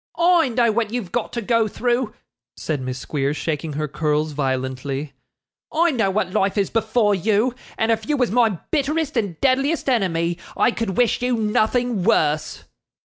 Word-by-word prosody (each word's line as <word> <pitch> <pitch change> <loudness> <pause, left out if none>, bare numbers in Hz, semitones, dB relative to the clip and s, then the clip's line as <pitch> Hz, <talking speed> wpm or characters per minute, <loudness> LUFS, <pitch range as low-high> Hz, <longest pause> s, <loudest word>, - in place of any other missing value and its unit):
'I 340 -4 +4
know 235 -1 +2
what 225 0 0
you've 230 -7 -4
got 240 0 -2
to 235 -1 -3
go 230 0 +2
through,' 240 +1 -1 0.4
said 150 -4 -3
Miss 130 0 -4
Squeers, 140 +2 -2
shaking 155 -1 -3
her 150 +1 -2
curls 150 +1 0
violently. 135 0 -3 0.6
'I 335 +2 +3
know 225 -8 +1
what 190 -2 -1
life 195 +2 0
is 200 -2 +1
before 220 -1 +2
you, 215 +5 +1 0.2
and 225 +1 +1
if 220 +2 -1
you 295 - +2
was 250 -5 +1
my 225 -5 +3
bitterest 300 0 0
and 200 -9 -1
deadliest 275 +4 +1
enemy, 175 -8 +1 0.2
I - - +4
could 220 -5 -3
wish 245 -1 +2
you 250 -1 +1
nothing 220 0 +1
worse. 155 -7 +1
215 Hz, 170 wpm, -22 LUFS, 160-245 Hz, 0.6 s, I